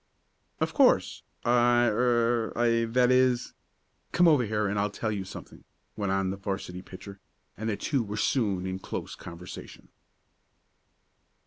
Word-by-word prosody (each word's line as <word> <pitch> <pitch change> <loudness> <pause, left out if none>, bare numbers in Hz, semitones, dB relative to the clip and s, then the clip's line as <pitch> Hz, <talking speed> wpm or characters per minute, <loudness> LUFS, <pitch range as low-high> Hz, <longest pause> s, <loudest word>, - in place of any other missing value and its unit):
"Of - - -1
course. - - +3 0.2
I 120 0 +4
er 120 0 +2
I 115 -1 +2
that 125 +2 +2
is 125 -1 +2 0.3
" - - -45
"Come 175 0 +5
over 150 -6 +5
here 105 0 -1
and 100 +1 -1
I'll 105 +1 +1
tell 110 +2 -3
you 100 -2 -3
something," 95 - -11 0.3
went 100 -2 -2
on 95 -1 0
the 100 - -5
'varsity 95 -2 -5
pitcher, 95 +1 -11 0.4
and 110 +2 -4
the 105 - -1
two 140 -4 0
were 105 -1 -5
soon 100 -7 0
in 95 0 -3
close - - -6
conversation. 90 +1 -10
110 Hz, 150 wpm, -28 LUFS, 95-120 Hz, 0.4 s, Come